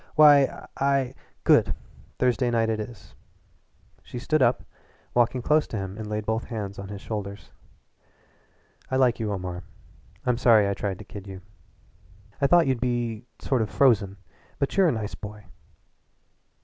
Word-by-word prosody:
"Why, 145 -3 +6
I 135 -2 +1 0.2
" - - -39
"Good! - - +4 0.4
Thursday 125 0 +2
night 115 -1 +1
it 110 - -2
is." 105 -6 -8 0.9
She - - -9
stood 150 +5 0
up - - +3
and - - -20 0.5
walking 120 +1 +2
close 150 +3 +3
to 110 - -5
him 95 -1 -4
laid 105 0 -4
both 110 +2 -1
hands 100 -4 -5
on 100 - -6
his 100 0 -8
shoulders. 100 -2 -6 1.4
"I 130 - -1
like 125 -3 +3
you, 110 -2 -2
Omar. 90 -2 -4 0.6
I'm 125 -1 +2
sorry 110 -5 +5
I 100 - 0
tried 100 -1 -3
to 105 - -11
kid 100 -1 -10
you. 95 -1 -8 1.0
I 140 - +4
thought 175 +2 +5
you'd 130 -3 0
be 120 -2 -2
sort 130 -4 0
of 110 - -1
frozen, 105 -7 +3 0.4
but 140 - -1
you're 195 -2 +5
a - - +3
nice 110 -4 -4
boy." 105 0 -9
115 Hz, 160 wpm, -26 LUFS, 105-130 Hz, 1.4 s, Why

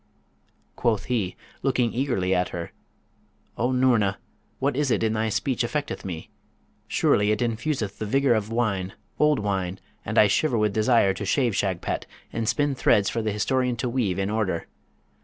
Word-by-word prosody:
Quoth 110 -4 +1
he, 110 -8 -1 0.3
looking 125 -3 +1
eagerly 95 -8 0
at 90 0 +1
her, 85 -1 -5 0.8
'O 125 +2 0
Noorna, 120 -6 +3 0.4
what 140 0 0
is 145 0 +1
it 115 - +1
in 110 -1 +1
thy 110 0 0
speech 125 +3 -1
affecteth 145 +4 -2
me? 85 -4 -6 0.6
Surely 105 0 +2
it 105 - +2
infuseth 115 -2 -2
the 110 - -3
vigour 135 +2 +3
of 110 -1 -1
wine, 100 -5 -1 0.3
old 150 -1 +4
wine; 95 -2 -2 0.2
and - - -4
I - - +8
shiver 120 +5 +2
with 105 -2 +1
desire 110 -2 +3
to 100 - -6
shave 120 +1 +1
Shagpat, 95 -3 -1 0.3
and 115 -1 -1
spin 145 -1 +1
threads 105 -6 +3
for 115 - -1
the 110 -1 -1
historian 125 +4 0
to 120 +1 -2
weave 115 -8 0
in 100 +1 -1
order. 105 -6 -1
110 Hz, 170 wpm, -25 LUFS, 100-125 Hz, 0.8 s, I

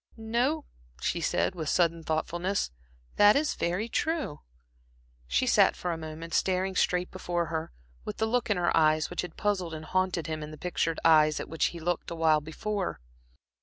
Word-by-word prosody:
"No," 245 +7 0 0.3
she - - -1
said, - - +1
with 160 -5 -4
sudden 170 -1 +2
thoughtfulness 175 +5 -1 0.5
"that 205 0 +7
is 295 +2 +2
very 180 +6 -1
true." 310 - -1 0.9
She - - +1
sat - - +4
for 180 - -3
a 165 - -2
moment 160 +1 -7
staring 190 +2 +1
straight 180 0 +1
before 175 -2 -2
her, 160 +1 -3 0.3
with - - -6
the 220 - +1
look 235 +1 0
in 205 - +2
her 175 -1 +1
eyes 155 0 +3
which 175 - -1
had 175 -3 -8
puzzled 185 -6 -1
and 155 0 -8
haunted 185 -2 0
him 155 -1 -4
in 150 - -6
the 155 - -9
pictured 165 -1 -1
eyes 155 -2 +5
at - - -5
which 160 - 0
he 170 - -2
had 165 - -10
looked 175 -1 -1
awhile 160 -2 +2
before. 190 +6 -3
175 Hz, 185 wpm, -29 LUFS, 160-195 Hz, 0.9 s, that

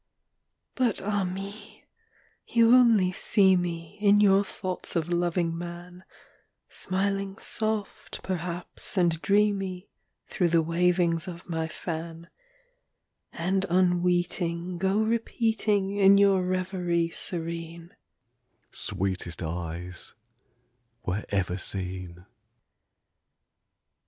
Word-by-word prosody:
VI. - - -51 0.8
But, 225 - -2
ah 205 0 0
me! 195 +3 -7 0.6
you 230 0 +5
only 230 -7 +5
see 190 +1 +4
me, 170 0 -4
In 205 0 +5
your 200 -1 +5
thoughts 185 -2 -5
of 165 0 0
loving 175 -1 0
man, 175 +1 -8 0.6
Smiling 195 +1 -1
soft 215 -2 -2
perhaps 175 +1 -4
and 170 -3 +2
dreamy 200 -2 0 0.3
Through 180 - 0
the 165 -1 +3
wavings 170 0 +2
of 170 -1 -8
my 165 -2 -2
fan; 165 +1 -6 1.0
And 190 +3 -1
unweeting 175 -1 +1
Go 190 +2 +1
repeating, 220 -3 0
In 200 0 +6
your 200 -2 +4
reverie 180 -2 -1
serene, 170 -1 -5 0.8
"Sweetest 95 -3 -3
eyes 85 +2 -6 0.9
were 95 +4 -2
ever 95 -2 -1
seen 90 -2 -5
" - - -17
VII. 90 - -16
180 Hz, 100 wpm, -27 LUFS, 165-195 Hz, 1.0 s, In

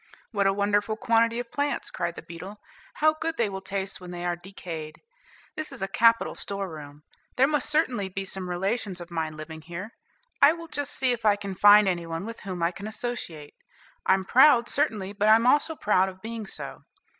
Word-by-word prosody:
"What 200 -3 +2
a - - +4
wonderful 205 +2 +1
quantity 230 +1 +2
of 245 -1 -6
plants," 285 0 -1
cried 170 0 -3
the - - -9
beetle; 185 +5 -9 0.4
"how 310 +1 +4
good 320 +1 -3
they 230 -3 +1
will 190 -1 -6
taste 195 0 -4
when 180 - -9
they 175 0 -5
are 175 0 0
decayed! 170 -4 -8 0.6
This 310 -1 -4
is 265 -7 -5
a - - 0
capital 230 +3 +3
store 200 -1 -4
room. 150 -3 -10 0.3
There 260 - +5
must 295 +1 0
certainly 255 -10 +1
be 195 +1 -4
some 190 -1 -4
relations 190 +1 -2
of 175 0 -10
mine 160 -2 -3
living 160 +1 -8
here; 175 +7 -7 0.5
I 295 - +8
will 335 0 -9
just 285 -2 -2
see 260 -1 +2
if 235 -2 -3
I 210 -2 +5
can 200 -1 -6
find 205 +2 +7
any 175 -3 -1
one 165 +3 -4
with 230 0 -7
whom 185 -4 -5
I 170 - +2
can 200 +4 -8
associate. 215 -10 -5 0.5
I'm 190 0 +2
proud, 245 0 +6
certainly; 215 -9 -1
but 210 +1 +2
I'm 225 +2 +6
also 295 +5 +4
proud 190 -7 +2
of 185 0 -12
being 225 -2 -5
so." - - -7
200 Hz, 205 wpm, -26 LUFS, 180-235 Hz, 0.6 s, I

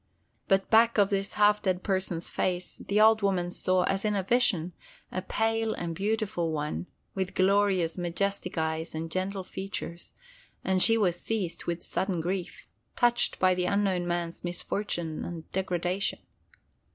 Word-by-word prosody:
But 195 -1 +3
back 230 +1 +5
of 200 0 +4
this 195 0 0
half 210 0 +4
dead 185 -2 0
person's 185 -3 -1
face, 180 -1 -2
the 205 +1 -1
old 220 0 +6
woman 185 -3 0
saw—as 185 +2 +1
in 210 -1 +1
a 195 - 0
vision—a 240 - -1
pale 225 0 0
and 170 -1 -4
beautiful 195 -3 -1
One 150 +3 -3 0.3
with 190 -1 -3
glorious, 190 -3 +2
majestic 180 +1 -2
eyes 160 0 -2
and 160 +1 -4
gentle 190 +2 -2
features, 185 -3 -6 0.5
and 190 -1 +1
she 225 +2 +7
was 180 -5 +1
seized 205 -7 -2
with 170 0 -3
sudden 185 -1 -1
grief—touched 195 +7 -1
by 185 0 +4
the 180 0 -1
unknown 190 -2 +1
man's 175 -1 -3
misfortune 175 -2 -3
and 165 -2 -7
degradation. 185 0 -1
185 Hz, 140 wpm, -28 LUFS, 175-205 Hz, 0.5 s, she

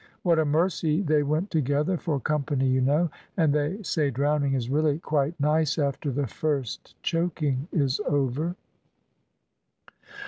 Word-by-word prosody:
What 170 -3 +3
a 160 - +2
mercy 160 +2 +1
they 155 -3 +3
went 155 +7 -1
together 150 +4 +1
for 155 -4 -2
company, 140 -2 0
you 130 0 +2
know; 150 +5 +2 0.3
and 160 -5 +3
they 150 +8 -1
say 155 -5 0
drowning 140 +1 +1
is 120 -3 -2
really 150 +2 +1
quite 155 0 -1
nice 150 0 +2
after 140 -1 -1
the 140 +2 -1
first 140 -1 -3
choking 155 -5 -1
is 140 -1 +1
over." 145 +5 0
150 Hz, 140 wpm, -26 LUFS, 140-160 Hz, 0.3 s, What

